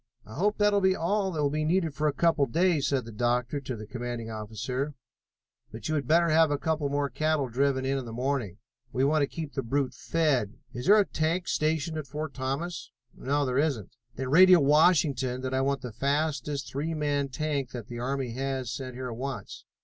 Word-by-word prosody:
"I 110 - -11
hope 205 - +1
that 205 0 +3
will 200 - +3
be 190 0 +3
all 195 +3 0
that 155 -4 -1
will 140 - +1
be 155 +1 -1
needed 165 -1 +1
for 150 +2 0
a - - +3
couple 155 -1 +2
of 115 - -14
days," 170 -3 +2
said 135 -4 0
the 115 - -8
doctor 120 +5 0
to 130 -2 -5
the 110 -1 -8
commanding 120 -1 -5
officer, 120 +7 -4 0.8
"but 110 -1 -6
you 155 - -1
had 145 -2 -1
better 170 +2 +4
have 160 0 +5
a 145 - 0
couple 155 -1 -1
more 145 0 0
cattle 155 0 0
driven 130 +2 +1
in 135 +1 0
in 130 - -6
the 115 - -7
morning. 120 -5 -2 0.3
We 130 0 0
want 150 +2 +3
to 140 - +2
keep 155 -1 -6
the 135 - -1
brute 135 +2 0 0.2
well 165 0 +2
fed. 125 -9 +2 0.2
Is 125 +1 -5
there 210 - +8
a 205 - +4
tank 170 +2 -1
stationed 155 +1 0
at 145 - -7
Fort 150 +2 -5
Thomas?" 140 +6 -3 0.3
"No, 145 +2 0
there 130 +1 0
isn't." 135 - -1 0.2
"Then 130 +1 -4
radio 180 +4 +8
Washington 140 -4 +3
that 130 0 -3
I 130 - +2
want 135 -1 0
the 125 -3 -7
fastest 140 +1 -1
three 155 +4 -2
man 145 -2 0
tank 145 -2 -2
that 120 -4 -7
the 120 -1 -6
army 130 0 -2
has 130 0 -3
sent 130 0 -6
here 130 0 -5
at - - -5
once. 135 +2 -6
140 Hz, 225 wpm, -28 LUFS, 125-155 Hz, 0.8 s, there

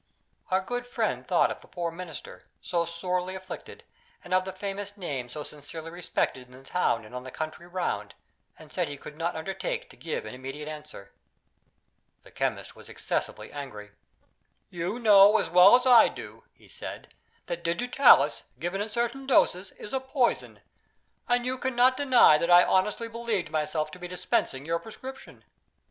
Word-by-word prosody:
Our 185 +1 +2
good 245 +5 -4
friend - - -2
thought - - +3
of - - -7
the - - -17
poor 170 -2 -3
Minister, 170 -2 -9
so 170 -2 -1
sorely 180 +2 -2
afflicted, 190 0 -9 0.4
and - - -5
of 185 0 +3
the 190 - -4
famous 200 +1 -5
name 140 -10 -4
so 150 +4 -6
sincerely 155 +3 -9
respected 165 -7 -2
in 125 - -18
the 130 +1 -14
town 115 -11 0
and 110 - -14
in 125 - -5
the 130 - -8
country 160 +5 -6
round, 180 0 -3 0.4
and - - -14
said - - -1
he 145 - -6
could 150 +2 -10
not 170 +2 -2
undertake 480 - -4
to - - -15
give 160 - -4
an 110 - -7
immediate 135 +4 -7
answer. 150 -10 -9 1.1
The - - -17
chemist - - -3
was - - -10
excessively - - -3
angry. 105 -8 -8 0.8
"You 175 +5 -3
know 210 -2 +7
as - - -2
well 180 +5 +9
as 250 0 +2
I 245 -3 +8
do," - - -9
he - - -22
said, - - -9 0.3
"that 170 -1 -4
Digitalis, 175 - +4 0.2
given 175 +7 -3
in 210 - -3
certain 240 +4 -2
doses, 190 -7 +3
is 210 - -10
a 265 - +1
poison, 260 -1 -1 0.7
and 245 0 +2
you 255 0 -2
cannot 255 0 +3
deny 255 - +6
that 170 - -1
I 175 0 +8
honestly 210 +4 +1
believed 225 -8 -3
myself 155 0 -1
to 180 - -11
be 180 - -6
dispensing 145 -6 -1
your 165 +1 0
prescription. 265 +6 -10
180 Hz, 175 wpm, -28 LUFS, 155-230 Hz, 1.1 s, well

